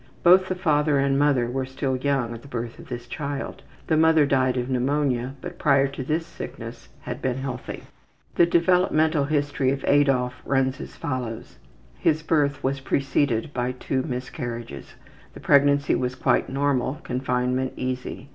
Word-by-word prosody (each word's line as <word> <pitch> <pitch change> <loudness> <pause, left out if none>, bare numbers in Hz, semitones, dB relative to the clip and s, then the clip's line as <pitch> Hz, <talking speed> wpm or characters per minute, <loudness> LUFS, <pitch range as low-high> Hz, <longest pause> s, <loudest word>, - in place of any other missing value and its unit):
Both 185 +2 +6
the 185 - -1
father 150 -4 +2
and 135 0 +2
mother 140 -4 +3
were 130 +2 -2
still 130 0 -2
young 130 -3 0
at 115 - -8
the - - -14
birth 120 -3 -5
of - - -12
this 120 -1 -5
child. 140 0 -5 0.2
The 160 - +1
mother 160 -1 +5
died 130 -2 +2
of 125 0 -1
pneumonia, 130 0 0
but - - -8
prior 140 -2 +4
to 135 -1 -6
this 160 +5 -1
sickness - - -9
had - - -6
been 130 -1 -1
healthy. 130 -2 -5 0.5
The 170 - +4
developmental 170 -4 +3
history 145 -2 0
of 135 +1 -2
Adolf 135 -3 +2
runs 135 -1 0
as - - -9
follows: 125 -4 -5 0.4
His 155 0 +1
birth 145 -3 +1
was 135 +1 0
preceded 140 0 0
by 125 0 -1
two 130 +1 -2
miscarriages. 125 -3 -6 0.4
The - - -9
pregnancy 140 0 +4
was 125 0 -1
quite - - +1
normal; 135 -1 0
confinement 125 0 -1
easy. 130 +1 -4
135 Hz, 160 wpm, -24 LUFS, 125-145 Hz, 0.5 s, Both